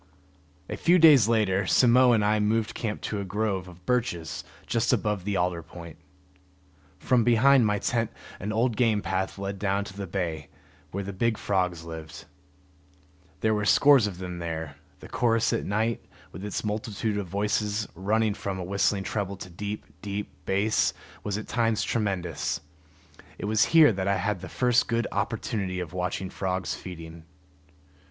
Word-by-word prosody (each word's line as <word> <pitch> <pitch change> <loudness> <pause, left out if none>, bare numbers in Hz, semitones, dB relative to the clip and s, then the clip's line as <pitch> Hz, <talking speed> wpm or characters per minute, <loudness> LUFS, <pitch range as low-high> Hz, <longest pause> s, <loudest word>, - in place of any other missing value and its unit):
A - - -5
few 175 +2 +4
days 150 - +7
later 105 -4 +2
Simmo 125 +8 +5
and 110 -3 +3
I 105 +1 +2
moved 110 +1 +1
camp 110 -2 -4
to 105 - -3
a - - -2
grove 100 -1 -2
of 90 0 -14
birches 115 -11 -1 0.2
just 115 0 +1
above 105 -5 0
the 100 -1 0
alder 90 -1 0
point. 85 0 -11 1.0
From 125 -2 +2
behind 120 +1 +5
my 105 0 +1
tent 115 +1 0 0.3
an 105 - -3
old 115 +1 +1
game 110 -4 +2
path 95 0 -2
led 100 0 -4
down 100 0 0
to 95 - -9
the 100 -1 -5
bay 85 -5 -3 0.4
where 100 +5 -4
the 100 +1 -6
big 115 +3 0
frogs 90 -4 -1
lived. 80 -1 -9 1.2
There 110 0 +2
were 105 -1 0
scores 135 +1 +6
of 95 -4 -6
them 90 -1 -6
there; 80 -3 -4 0.3
the - - -9
chorus 115 -1 +1
at 115 - -1
night, 110 +3 -1 0.3
with 95 - -9
its 105 - -3
multitude 105 0 -2
of 100 - -4
voices 105 +2 -1
running 105 +4 +1
from 100 -1 -4
a - - -3
whistling 100 +1 +1
treble 100 -1 -3
to 90 -1 -9
deep, 105 +4 -5 0.2
deep 100 0 -4 0.2
bass, 100 +3 +2 0.3
was 105 -1 -2
at 110 - -6
times 115 -2 +1
tremendous. 95 -8 -1 0.8
It - - -5
was 110 +1 +3
here 160 -5 +6
that 95 0 -2
I 100 - +3
had 95 0 -1
the 95 - -7
first 125 +2 +2
good 115 0 0
opportunity 100 -5 -2
of 90 -3 -5
watching 90 +1 -3
frogs 95 -1 -2
feeding. 85 -2 -9
100 Hz, 170 wpm, -27 LUFS, 95-110 Hz, 1.2 s, days